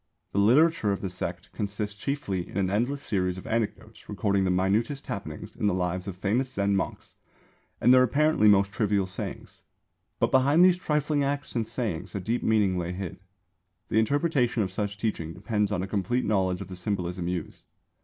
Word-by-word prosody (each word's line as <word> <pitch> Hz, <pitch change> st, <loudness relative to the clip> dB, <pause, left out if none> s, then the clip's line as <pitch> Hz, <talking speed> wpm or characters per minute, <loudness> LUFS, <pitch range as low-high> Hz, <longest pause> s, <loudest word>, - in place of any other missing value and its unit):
The 100 Hz, -, 0 dB
literature 125 Hz, +2 st, +4 dB
of 100 Hz, -, -2 dB
the 95 Hz, -, -3 dB
sect 90 Hz, 0 st, -5 dB
consists 105 Hz, 0 st, -3 dB
chiefly 105 Hz, -7 st, -3 dB
in -, -, -6 dB
an 95 Hz, -1 st, +1 dB
endless 125 Hz, +7 st, 0 dB
series 90 Hz, -3 st, -1 dB
of 95 Hz, -, -9 dB
anecdotes 110 Hz, -1 st, -3 dB
recording 100 Hz, -1 st, +1 dB
the -, -, +1 dB
minutest 100 Hz, +9 st, +1 dB
happenings 100 Hz, -10 st, -6 dB
in 105 Hz, -, 0 dB
the 95 Hz, -, +2 dB
lives 90 Hz, +1 st, -2 dB
of 95 Hz, -2 st, -5 dB
famous 120 Hz, +7 st, 0 dB
Zen 100 Hz, -4 st, +1 dB
monks 95 Hz, -, -3 dB, 0.7 s
and 125 Hz, +3 st, +6 dB
their 130 Hz, -, +7 dB
(apparently) 140 Hz, -1 st, +3 dB
most 100 Hz, -1 st, +5 dB
trivial 105 Hz, -3 st, +1 dB
sayings. 95 Hz, 0 st, -7 dB, 0.6 s
But -, -, +1 dB
behind 140 Hz, +7 st, +5 dB
these 180 Hz, -1 st, +4 dB
trifling 150 Hz, -3 st, 0 dB
acts 140 Hz, +1 st, -2 dB
and 115 Hz, -2 st, 0 dB
sayings 105 Hz, -7 st, -4 dB
a -, -, -1 dB
deep 115 Hz, +6 st, -1 dB
meaning 100 Hz, -5 st, +2 dB
lay 85 Hz, +1 st, -3 dB
hid. 95 Hz, -2 st, -6 dB, 0.7 s
The 110 Hz, -, +3 dB
interpretation 125 Hz, -2 st, +1 dB
of 95 Hz, -, -4 dB
such 100 Hz, +1 st, -3 dB
teaching 95 Hz, -7 st, -2 dB
depends 105 Hz, +2 st, -1 dB
on 95 Hz, -3 st, -1 dB
a -, -, -3 dB
complete 105 Hz, +6 st, -1 dB
knowledge 95 Hz, -3 st, +1 dB
of -, -, -6 dB
the 95 Hz, -, -8 dB
symbolism 90 Hz, -1 st, -3 dB
used. 90 Hz, -2 st, -4 dB
105 Hz, 185 wpm, -27 LUFS, 95-120 Hz, 0.7 s, their